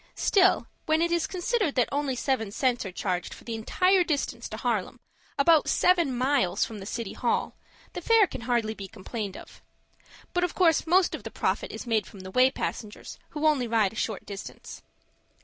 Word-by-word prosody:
Still, 375 -2 +3 0.2
when 315 0 +3
it 340 +1 +1
is 340 -2 +1
considered 370 - -1
that 250 -3 +3
only 280 -2 -1
seven 250 -4 -1
cents 240 -1 0
are - - -6
charged 180 -1 -3
for - - -15
the 230 - -5
entire 365 - +2
distance 300 -5 -2
to - - -6
Harlem, - - -2 0.4
about 310 +2 +4
seven 340 -8 +3
miles 245 -8 +2
from 220 -2 -8
the 195 - -8
City 230 -3 -4
Hall, 240 - -1 0.4
the - - -5
fare 455 -2 +5
can 260 - -8
hardly 235 -2 0
be 200 -3 -8
complained 205 +1 -6
of. - - -13 0.7
But 355 - +1
of 360 - -1
course 335 -3 +3
most 360 +2 +4
of - - -5
the - - -7
profit - - -2
is - - -7
made 225 -3 0
from 195 - -12
the 185 0 -9
way 255 +5 +5
passengers 215 -5 -6
who 305 0 -3
only 290 -6 +3
ride 220 -3 +2
a - - -13
short 220 -2 -3
distance. 200 -1 -9
255 Hz, 195 wpm, -27 LUFS, 220-330 Hz, 0.7 s, fare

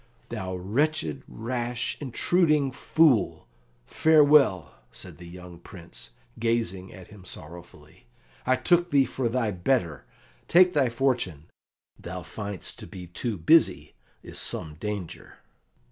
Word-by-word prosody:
"Thou 95 0 -4
wretched, 140 - -1
rash, 120 +1 -3
intruding 150 +1 +2
fool, 135 -4 +2 0.4
farewell," 150 - +4 0.2
said - - -7
the 85 - -10
young 90 0 -11
Prince, 85 -10 -11 0.3
gazing 115 -5 -1
at 95 -2 -13
him 105 -3 -14
sorrowfully. 85 -5 -11 0.4
"I 130 - +3
took 175 +5 +2
thee 140 -4 +4
for 130 -1 -2
thy 115 -3 0
better; 90 - -1 0.4
take 180 +1 +6
thy 135 -4 +2
fortune! 115 - -1 0.6
Thou - - -7
find'st 100 -2 -7
to - - -9
be 90 -2 -9
too 105 +5 -4
busy 155 - +3 0.3
is - - -6
some 75 - -2
danger." 100 -3 -6
115 Hz, 120 wpm, -26 LUFS, 90-140 Hz, 0.6 s, take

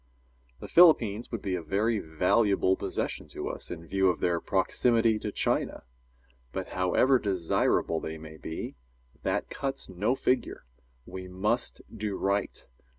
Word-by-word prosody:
The - - -6
Philippines 120 - +5
would 115 - -4
be 95 - -1
a 90 - -1
very 105 +7 0
valuable 95 +4 +2
possession - - -4
to - - -5
us, - - -7
in 85 -1 -7
view 95 +2 +2
of 90 - -1
their 85 -1 +1
proximity 115 +3 +2
to 105 - -4
China. - - -1 0.7
But, - - -4
however 110 +9 +3
desirable 90 -4 +1
they 80 0 -5
may 80 0 -11
be, 80 - -6 0.5
that - - -1
cuts 135 0 -3
no 105 +7 0
figure. 125 - -1 0.4
We 95 -1 -7
must 105 +7 -2
do 105 -2 -3
right. 100 0 -1
100 Hz, 145 wpm, -28 LUFS, 90-115 Hz, 0.7 s, Philippines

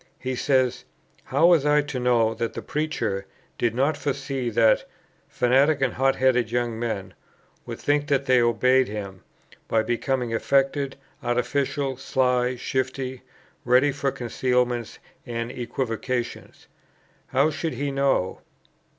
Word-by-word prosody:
He 130 0 -4
says, 130 -2 +1 0.4
"How 140 +5 +2
was 170 -4 +5
I 150 0 +3
to 145 -3 -4
know 120 -3 +2
that 115 0 -3
the - - -5
preacher... 150 -11 -2 0.3
did 115 -1 +1
not 140 +4 +2
foresee, 135 -3 -3
that 115 -1 +3 0.4
[fanatic 135 +5 +3
and 135 -3 +1
hot 135 +1 +2
headed 125 -3 +2
young 120 -1 -1
men] 110 -5 -3 0.5
would - - -5
think 145 0 0
that 140 -2 +1
they 130 -2 +4
obeyed 125 +2 +3
him, 100 -3 -6 0.5
by 110 -1 +2
becoming 120 +1 -1
affected, 135 +3 +1 0.3
artificial, 135 +2 -1
sly, 125 -2 +1
shifty, 130 0 -3 0.4
ready 125 +4 +4
for 140 0 -1
concealments 125 -1 -1 0.3
and 115 0 -3
equivocations?" 120 0 -4 0.6
"How 140 +4 +2
should 160 +1 -3
he 140 +3 -2
know!" 135 -9 0
130 Hz, 130 wpm, -24 LUFS, 120-140 Hz, 0.6 s, was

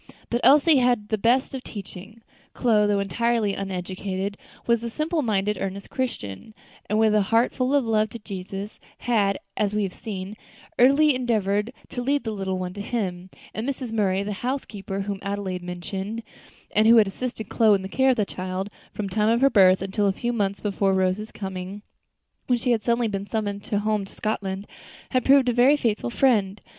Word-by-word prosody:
But 240 +1 0
Elsie 290 +4 +6
had 250 -1 +4
had 210 0 -16
the 215 - +1
best 245 +6 +2
of 265 - -4
teaching. 205 +2 -9 0.3
Chloe, 215 -4 +3
though 205 -1 +2
entirely 220 +1 0
uneducated, 190 +1 -4 0.3
was 235 -1 +2
a 235 - -3
simple 310 +6 -1
minded, 210 -4 0
earnest 195 +1 -5
Christian, 220 - -4 0.3
and 210 - +1
with 220 -1 +4
a 210 - +4
heart 225 +5 +2
full 255 +2 +1
of 280 -4 +2
love 215 -1 +2
to 235 - -7
Jesus, 195 -1 -7 0.2
had, 205 -5 +1 0.2
as 210 0 0
we 210 - +1
have 190 -2 -3
seen, 200 -2 -6 0.4
early 280 +4 +6
endeavored 220 -4 0 0.2
to 245 - -4
lead 280 +3 0
the 220 - -3
little 190 -2 -2
one 180 0 -4
to 200 - -6
Him, 190 -5 -3 0.2
and 225 +5 -3
Mrs. 255 -4 -4
Murray 200 -3 +1
the 205 +1 -3
housekeeper 205 -7 -3
whom 200 0 -4
Adelaide 200 -2 -3
had 180 - -7
mentioned, 195 +5 -5 0.5
and 215 +1 +3
who 230 - +8
had 220 - +7
assisted 220 +1 -5
Chloe 220 -3 +4
in 190 - -3
the - - -4
care 265 +7 +2
of 255 - +3
the 210 - +2
child 185 +2 -4 0.2
from 210 - -4
the 195 - -6
time 215 0 +2
of 235 +2 +2
her 275 0 +5
birth 190 -3 +5
until 200 +1 0
a - - +3
few 240 +4 -2
months 200 -3 -1
before 200 -1 +1
Rose's 190 +3 0
coming, 190 +1 -6 0.6
when 245 - +3
she 245 +1 0
had 230 -2 +2
suddenly 235 +2 +1
been 200 -1 -4
summoned 205 -2 -3
home 210 -1 0
to - - -10
Scotland 200 -2 -3 0.5
had 255 -2 +2
proved 270 -1 +5
a 245 - +3
very 255 +5 +5
faithful 215 - -1
friend. 210 - +2
210 Hz, 200 wpm, -24 LUFS, 195-235 Hz, 0.6 s, who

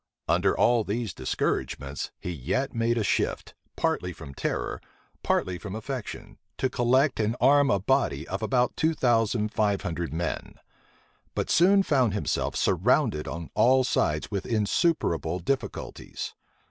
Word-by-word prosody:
Under - - +2
all 120 -2 +4
these 105 -1 -3
discouragements 70 +1 -2
he 90 - -5
yet 90 - -2
made 115 +1 +1
a 110 - +1
shift, - - -1 0.2
partly - - 0
from 70 - -10
terror, - - -3 0.4
partly 90 -1 0
from 100 -1 -6
affection, 125 +2 -6 0.2
to 130 - 0
collect 130 +2 +2
and 110 +2 +1
arm 145 0 +5
a 100 - +3
body 95 - 0
of 95 +1 -4
about 125 +2 +1
two 160 +1 +1
thousand 115 -4 +1
five 105 -3 +1
hundred 85 -3 -3
men; 85 +1 -3 0.8
but - - -1
soon 195 +3 +5
found 130 - +2
himself 105 - -1
surrounded 75 0 +2
on 85 -1 -6
all 130 +2 +4
sides 75 -8 0
with 100 -2 -3
insuperable 105 - +1
difficulties. 130 +10 -4
110 Hz, 140 wpm, -27 LUFS, 90-130 Hz, 0.8 s, arm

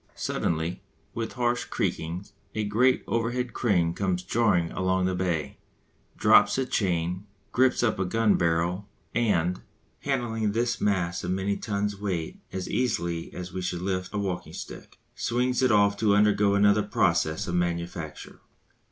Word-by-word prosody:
Suddenly, 80 +1 -2 0.3
with 115 -1 -4
harsh 120 -1 0
creakings, 85 +4 -3 0.2
a 110 - 0
great 120 +5 +2
overhead 120 +2 -1
crane 90 -8 +1
comes 90 -1 -1
jarring 90 -5 +2
along 95 0 0
the 95 - +1
bay, 90 -5 -2 0.6
drops - - +5
a 135 - +1
chain, 90 -3 -1 0.2
grips 130 -1 +3
up 110 -5 +1
a 95 - +1
gun 110 +3 +2
barrel, 85 +4 0 0.2
and, 90 -7 +1 0.4
handling 115 -6 -1
this 120 +1 0
mass 90 -4 0
of 85 - -3
many 95 +2 0
tons' 100 -1 -2
weight 90 -6 -3
as 95 -1 -4
easily 85 -9 -1
as 90 0 -7
we 95 - -3
should 90 -1 -3
lift 95 -1 -2
a 105 - -3
walking 95 -3 -3
stick, - - -9 0.2
swings 125 +2 0
it 130 -2 +4
off 100 -1 +4
to 105 -1 +3
undergo 105 -1 +4
another 100 +1 +4
process 85 -6 +1
of 85 - -3
manufacture. 85 -2 -3
100 Hz, 150 wpm, -27 LUFS, 90-110 Hz, 0.6 s, drops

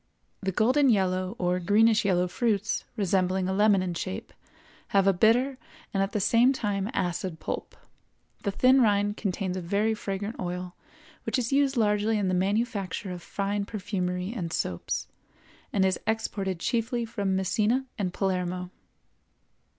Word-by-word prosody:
The 190 -1 -1
golden 255 +8 +3
yellow 185 -2 +1
or 180 0 0
greenish 210 +4 +4
yellow 180 -2 +2
fruits, 215 +1 0
resembling 190 -2 +1
a 190 - 0
lemon 205 -1 +4
in 180 -1 -2
shape, 95 - -5 0.5
have 195 -1 +3
a 195 - +5
bitter 245 +8 +3 0.3
and 195 - +1
at 195 - 0
the 210 - -1
same 235 +6 +4
time 205 -4 -2
acid 180 -5 -2
pulp; - - -5 0.6
the 200 - -1
thin 255 +6 +4
rind 205 -2 +2
contains 190 -2 -2
a - - -3
very 205 +6 +1
fragrant 205 +1 -4
oil 180 0 -4 0.5
which - - -1
is 250 +1 -1
used 275 -1 +2
largely 210 0 +2
in 200 -3 0
the - - 0
manufacture 200 0 -1
of 180 -1 -6
fine 200 +3 -2
perfumery 185 -2 -3
and 170 -7 -3
soaps, 90 - -2 0.6
and 195 -2 +2
is 190 -1 +1
exported 200 -4 -1
chiefly 235 +3 -1
from 200 -4 -1
Messina 215 +7 +1
and 185 -3 -1
Palermo. 180 -1 -2
200 Hz, 150 wpm, -27 LUFS, 185-220 Hz, 0.6 s, a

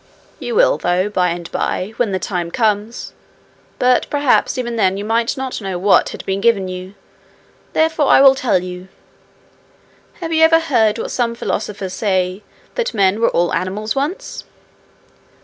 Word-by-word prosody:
'You 480 - -4
will, - - +4
though, 180 +3 0
by 180 -3 +1
and 170 0 -5
by, 190 +4 -2
when 235 -5 0
the 190 - 0
time 175 -2 -3
comes. 215 +1 -1 0.6
But 250 0 +2
perhaps 285 -1 +2
even 240 -2 -3
then 190 -4 +1
you 200 - -5
might 230 +3 0
not 265 -3 -4
know 190 -2 -3
what 195 +3 +3
had - - -9
been 195 +1 -2
given 205 -5 +2
you, 185 +1 -7 0.8
therefore 320 -2 +2
I - - +6
will 270 -1 +8
tell 245 -9 0
you. 180 0 -8 1.3
Have 330 -2 -5
you 320 0 +4
ever 325 0 +6
heard 230 -9 +2
what - - -4
some 235 -2 -1
philosophers 205 -4 -4
say 185 -1 -1 0.3
that 480 - -2
men 200 +1 +2
were 230 - +4
all 175 0 0
animals 210 +4 -2
once?' 330 - -3
215 Hz, 165 wpm, -18 LUFS, 185-260 Hz, 1.3 s, will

